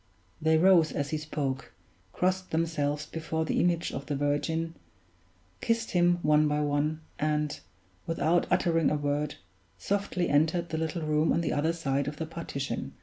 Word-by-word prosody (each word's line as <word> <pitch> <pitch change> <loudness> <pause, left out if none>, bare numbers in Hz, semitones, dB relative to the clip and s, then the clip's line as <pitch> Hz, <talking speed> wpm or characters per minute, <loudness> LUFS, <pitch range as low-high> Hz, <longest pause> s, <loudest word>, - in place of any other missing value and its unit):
They 160 +1 +4
rose 170 -3 +5
as 145 +1 -2
he 155 - -1
spoke, 140 -3 -3 0.4
crossed 185 - 0
themselves 150 -2 -1
before 160 0 -3
the - - 0
image 170 -1 +1
of 140 - -6
the 145 - -1
Virgin, 160 +3 -1 0.9
kissed 230 0 0
him 175 0 +3
one 150 0 +4
by 150 0 +1
one, 150 +2 0 0.2
and, 150 -1 0 0.5
without 165 +1 +1
uttering 165 -3 +3
a - - +1
word, 145 0 -1 0.4
softly 195 - -1
entered 160 +4 +2
the 160 - -2
little 160 +1 -2
room 155 +1 +2
on 165 - +2
the 165 - -1
other 150 +3 +1
side 140 -4 -1
of 145 - -3
the 160 - -3
partition. 155 -4 -5
155 Hz, 160 wpm, -29 LUFS, 145-170 Hz, 0.9 s, rose